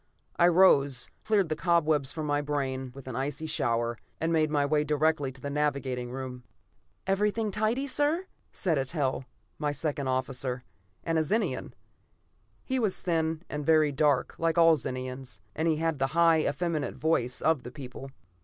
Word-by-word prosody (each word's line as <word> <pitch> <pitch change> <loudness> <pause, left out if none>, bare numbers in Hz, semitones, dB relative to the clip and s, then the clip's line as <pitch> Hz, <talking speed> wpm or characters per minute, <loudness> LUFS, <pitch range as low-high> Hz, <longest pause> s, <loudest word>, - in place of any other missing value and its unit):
I 175 - +5
rose, 145 -8 +4
cleared 205 -6 +2
the 155 - 0
cobwebs 155 -4 +2
from 155 -1 -4
my 145 0 +1
brain 135 -3 -2
with 135 -1 -11
an 130 - -5
icy 145 +4 -3
shower, 120 -6 -1 0.2
and 165 +1 0
made 155 -1 +3
my 145 -1 +2
way 150 +1 +2
directly 150 -1 +1
to 130 - -14
the 140 +2 -5
navigating 140 -4 -1
room. 125 -1 -6 0.6
"Everything 210 +2 +1
tidy, 220 +6 0
sir," 295 +6 +1 0.3
said 165 -6 0
Eitel, 135 -1 -1 0.3
my 150 -1 0
second 145 -1 -2
officer, 130 -1 -2 0.4
and 165 -1 +1
a - - +2
Zenian. 215 +8 -1 0.9
He 260 -1 0
was 215 -5 0
thin 165 -2 0
and 150 0 -4
very 155 -1 +4
dark, 140 -2 +2
like 165 0 +1
all 165 -1 +7
Zenians, 130 -4 -6 0.2
and 160 +2 0
had 160 -2 -1
the 135 - +2
high, 165 -1 +5
effeminate 155 0 -2
voice 125 -6 0
of 160 -4 +2
that 125 - -10
people. 135 -1 -8
150 Hz, 165 wpm, -28 LUFS, 135-165 Hz, 0.9 s, all